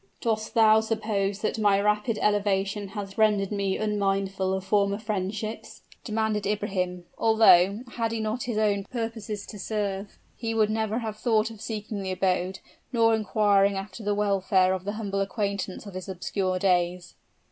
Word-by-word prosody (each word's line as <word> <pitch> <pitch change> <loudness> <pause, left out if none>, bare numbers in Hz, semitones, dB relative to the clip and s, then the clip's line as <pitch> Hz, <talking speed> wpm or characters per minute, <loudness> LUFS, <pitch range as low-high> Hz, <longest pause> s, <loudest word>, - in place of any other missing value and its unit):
"Dost 220 -2 -2
thou 220 -1 +6
suppose 215 -3 -1
that 220 - -1
my 205 -2 +4
rapid 210 +2 +1
elevation 200 -1 +1
has 200 0 -6
rendered 210 -2 +3
me 200 -2 0
unmindful 195 -2 0
of 190 0 -1
former 200 0 +2
friendships?" 215 +1 -4 0.2
demanded 215 -2 -1
Ibrahim; 185 -4 -2
although, 215 -2 +5
had 230 -2 -2
he 230 - -2
not 220 +3 -2
his 235 -3 -2
own 205 -2 +1
purposes 225 -3 -4
to 210 - -9
serve, 200 -1 -3 0.2
he 225 -1 -3
would 215 -1 +3
never 220 0 -1
have 220 -3 -4
thought 220 -1 +1
of 220 -2 -12
seeking 215 -2 -4
the 190 -1 -3
abode, 185 0 0 0.3
nor 230 -2 +4
inquiring 205 -2 +3
after 195 +3 -7
the 205 0 0
welfare 195 -2 +2
of 190 0 -4
the 205 - -2
humble 200 -2 -2
acquaintance 200 -1 -3
of 200 - -9
his 185 0 -7
obscure 185 0 -2
days. 180 -1 0
205 Hz, 160 wpm, -26 LUFS, 195-220 Hz, 0.3 s, thou